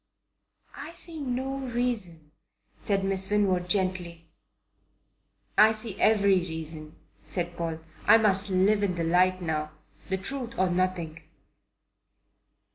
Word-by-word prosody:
"I 330 - -8
see 335 -2 -4
no 265 0 -3
reason," 235 - -3 0.5
said 195 -1 -1
Miss 195 0 0
Winwood 190 -4 +1
gently. 180 -3 -1 1.3
"I 215 +2 +7
see 215 -2 -4
every 200 -3 +4
reason," 160 -2 -6 0.3
said 175 -1 -3
Paul. 165 -1 -4 0.3
"I - - +8
must 205 -2 +4
live 195 +3 +3
in 195 -3 0
the 170 - -2
light 180 +2 +2
now. 155 -2 -2 0.4
The 190 - 0
truth 235 +4 -4
or 185 -1 +2
nothing." 175 -3 -2
190 Hz, 120 wpm, -27 LUFS, 170-215 Hz, 1.3 s, I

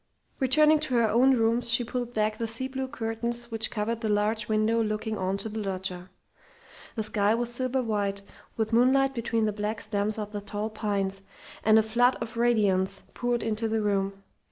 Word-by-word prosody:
Returning 305 +4 +4
to 295 -4 -2
her 235 -2 +4
own 250 +5 +4
rooms, 230 +1 +1
she 235 +1 +3
pulled 245 0 -4
back 215 0 0
the 230 - -1
sea 230 +4 -1
blue 265 0 -4
curtains 235 0 -3
which 225 -1 -1
covered 225 +1 -2
the 220 - -1
large 210 +1 +1
window 220 +1 +2
looking 215 0 -2
on 190 -1 -1
to 210 - -3
the 220 0 -5
loggia. 185 -2 -4 0.9
The 220 - -1
sky 210 0 +2
was 240 0 -2
silver 255 +1 -1
white 200 -3 -1 0.3
with 220 0 -1
moonlight 265 +3 +4
between 230 -2 0
the 210 - 0
black 210 +1 -3
stems 210 0 0
of 210 -1 -4
the 205 -1 -4
tall 205 +2 -4
pines, 200 -3 -2 0.4
and 215 0 +6
a 220 - +5
flood 240 +4 +3
of 230 +1 -6
radiance 200 -5 +2
poured 240 -1 -1
into 225 0 -1
the 220 -1 0
room. 195 -1 -1
220 Hz, 190 wpm, -27 LUFS, 210-235 Hz, 0.9 s, and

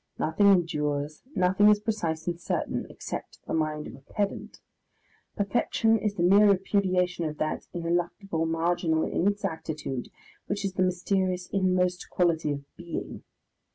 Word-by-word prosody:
Nothing 200 +6 +2
endures, 150 -5 +1
nothing 190 +3 +5
is 210 0 +5
precise 170 -8 -2
and 175 -1 -3
certain - - -2
(except - - -7
the - - -4
mind 155 -1 -1
of - - -8
a 130 - -12
pedant), 200 +9 -4 0.8
perfection 225 +2 +2
is 205 -1 -1
the 175 - 0
mere 200 +4 +6
repudiation 185 -3 +1
of 150 -1 -4
that 155 - -2
ineluctable 170 0 -1
marginal 165 0 +1
inexactitude 160 - -2 0.4
which 200 0 -2
is 195 - -2
the 185 - -1
mysterious 185 0 0
inmost 180 -2 +1
quality 165 -4 +1
of 140 0 -7
Being. 170 -1 -6
180 Hz, 135 wpm, -27 LUFS, 160-195 Hz, 0.8 s, mere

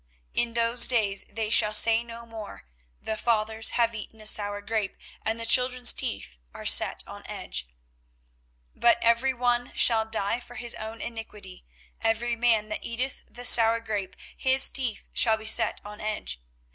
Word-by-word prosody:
24:031:029 - - +3
In 230 - -13
those 235 +1 +4
days 205 -5 0
they 220 0 -4
shall 210 -1 +3
say 225 +2 +5
no 235 0 -11
more, 220 - -10 0.4
The 220 - -4
fathers 220 -1 +1
have 235 -1 +2
eaten 220 0 -8
a 215 - -12
sour 205 -1 +1
grape, 205 -1 -3 0.3
and 225 +1 -2
the 230 - -2
children's 250 +1 +3
teeth 220 - -6 0.2
are - - -9
set - - +3
on - - -11
edge. - - -4 1.1
24:031:030 - - -28
But 235 - +5
every 235 +3 +2
one 245 0 -1
shall 225 -2 +4
die 220 +1 -2
for 245 0 -14
his 240 -1 -6
own 220 +1 -8
iniquity: 215 -5 -9 0.4
every 230 +1 0
man 225 -3 +1
that 215 - -5
eateth 250 +3 -4
the 245 +1 -9
sour 230 -1 +7
grape, 210 -4 -5 0.2
his 265 0 +3
teeth 245 -6 -2
shall 220 -2 +2
be 220 - -11
set 220 - +2
on 210 0 -10
edge. 205 - -4
225 Hz, 170 wpm, -26 LUFS, 215-235 Hz, 1.1 s, sour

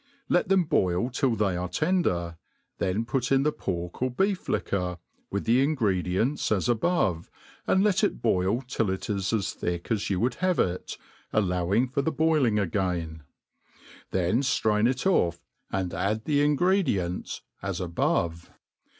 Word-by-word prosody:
Let 175 - +2
them 190 -2 +4
boil 95 - +1
tilL 125 -1 +1
they 100 -4 +1
are 90 0 -3
tender, 90 - 0 0.4
then 100 +5 0
put 125 +1 -1
in 135 0 +4
the 150 - +2
pork 90 -7 -5
or 130 - +2
beef 190 +9 -1
liquor, 90 -3 -1 0.3
with 100 - -3
the 120 +3 +4
ingredients 110 - 0
as 105 0 +1
above, 110 - +1 0.4
and 190 - +3
let 200 -3 +2
it - - +1
boil 95 - +1
till 115 -5 -1
it 95 +3 -3
is 100 -2 -1
as 105 -5 0
thick 85 +4 -4
as 105 -3 0
you 95 -3 0
would 120 +4 +1
have 185 -1 +2
it, 90 0 -1 0.3
allowing 95 +3 +1
for 135 +3 -1
the 160 - 0
boiling 155 -10 +2
again; 90 -5 -1 0.9
then 95 +5 +1
ftrain 110 -4 +2
it 130 +5 -2
off, 85 - +2 0.3
and 95 -2 -2
add 100 +6 -1
the 145 -1 +2
ingredients 145 - +1 0.2
as 95 -2 -3
above. 85 -1 -1
105 Hz, 155 wpm, -27 LUFS, 90-135 Hz, 0.9 s, them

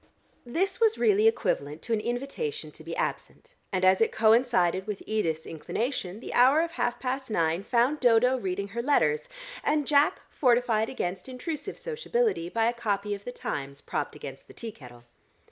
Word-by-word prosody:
This 360 +11 0
was 450 -1 +3
really 430 0 +4
equivalent 150 - 0
to 235 - -2
an 220 - +2
invitation 275 - -4
to - - -14
be - - -5
absent, - - -4 0.2
and 185 -1 +1
as 185 +2 +5
it 225 - +3
coincided 220 -5 +3
with 210 -2 -4
Edith's 165 -7 -1
inclination, 205 - -3
the - - -6
hour 265 +6 +6
of 335 0 -2
half 245 -5 -1
past 260 +1 -3
nine 165 -3 +1
found 245 +7 +2
Dodo 245 +1 +4
reading 200 -4 -3
her 235 +4 -3
letters, 455 - +2 0.3
and 300 -1 +1
Jack, 290 +1 +3
fortified 240 -4 +2
against 185 -2 -4
intrusive 300 +8 -5
sociability 475 - -1
by 225 +3 +1
a 235 - +2
copy 205 -3 -1
of 200 0 -7
the 245 - -4
Times 140 - -5
propped - - -4
against - - -9
the - - -15
tea 230 -2 -6
kettle. 120 - -14
240 Hz, 175 wpm, -28 LUFS, 195-290 Hz, 0.3 s, hour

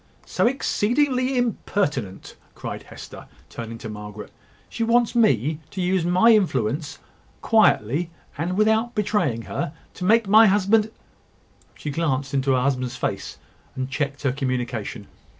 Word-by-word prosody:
"So - - +1
exceedingly 255 +1 +1
impertinent!" 150 - -2 0.2
cried - - -6
Hester, - - -11 0.2
turning 115 -1 -7
to 115 - -8
Margaret. 105 -1 -8 0.4
"She 230 - -3
wants 235 0 +2
me 155 - +2
to 190 - -8
use 180 -1 +1
my 185 +7 +5
influence, 145 - +1 0.5
quietly, 170 - +3 0.3
and 175 +5 -2
without 220 +3 +2
betraying 190 - 0
her, 145 - -4 0.2
to - - -8
make 220 +3 +4
my 215 +3 +7
husband 210 +2 +3 0.4
," - - -34
she 150 - -5
glanced 140 -3 -1
into 135 0 +2
her 130 - +2
husband's 130 -2 -1
face, - - -4 0.4
and 130 0 -4
checked 140 0 -3
her 135 - +2
communication. 125 -5 -3
160 Hz, 135 wpm, -23 LUFS, 130-215 Hz, 0.5 s, my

